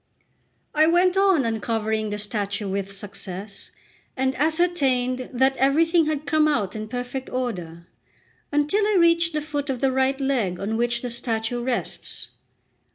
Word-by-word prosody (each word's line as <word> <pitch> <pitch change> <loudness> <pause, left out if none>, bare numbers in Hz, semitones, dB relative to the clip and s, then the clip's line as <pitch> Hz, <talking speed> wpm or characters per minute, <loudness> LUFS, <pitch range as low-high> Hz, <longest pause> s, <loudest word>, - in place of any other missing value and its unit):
I 310 +1 +4
went 355 +2 +4
on 385 -8 +4
uncovering 220 -1 -1
the 210 - -3
statue 205 -1 -2
with 195 0 -3
success, 195 0 -7 0.5
and 265 0 +1
ascertained 270 -5 +1
that 265 +2 +2
everything 325 +5 +3
had 305 -1 -2
come 305 +1 +3
out 210 -10 0
in 215 0 -5
perfect 250 +3 -5
order, 175 -10 -4 0.7
until 295 +8 +2
I 425 - +2
reached 335 -1 +4
the 300 -1 -1
foot 290 -1 -3
of 260 -2 -1
the 270 0 +2
right 265 +1 +1
leg 245 -10 0
on 210 +3 -2
which 240 +1 0
the 245 - -2
statue 235 0 -2
rests. 245 0 -3
255 Hz, 150 wpm, -24 LUFS, 215-300 Hz, 0.7 s, I